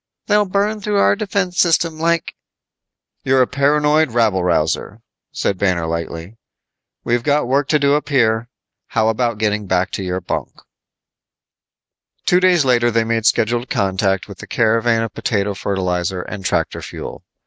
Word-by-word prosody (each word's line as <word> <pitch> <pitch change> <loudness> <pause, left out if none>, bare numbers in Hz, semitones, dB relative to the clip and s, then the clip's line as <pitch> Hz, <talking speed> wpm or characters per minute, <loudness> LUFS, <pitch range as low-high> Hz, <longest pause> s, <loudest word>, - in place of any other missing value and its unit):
"They'll 210 0 +3
burn 205 +2 0
through 205 0 -1
our 200 - +4
defense 200 -4 -2
system 165 -2 +2
like 165 0 0 0.5
" - - -58
"You're 130 -1 +3
a - - +1
paranoid 150 +3 +2
rabble 110 -6 +2
rouser," 90 +6 -1 0.3
said 95 - -2
Banner 90 -4 +1
lightly. 85 +4 -5 0.7
"We've 120 0 0
got 145 0 +1
work 140 +2 +1
to 155 - +3
do 140 -1 +2
up 150 +1 -1
here. 120 -4 +1 0.4
How 110 -1 +1
about 115 0 0
getting 105 -1 -1
back 95 +1 0
to 95 - -4
your 90 0 -2
bunk?" - - -4 1.7
Two 180 - +4
days 180 -5 +3
later 120 -2 +3
they 115 -1 +1
made 115 0 0
scheduled 120 +2 +1
contact 95 0 0
with 100 -3 -11
the - - -9
caravan 115 0 +2
of 115 - -5
potato 100 -2 -1
fertilizer 90 -2 -2
and 100 -2 -8
tractor - - -1
fuel. - - -8
115 Hz, 160 wpm, -18 LUFS, 100-150 Hz, 1.7 s, our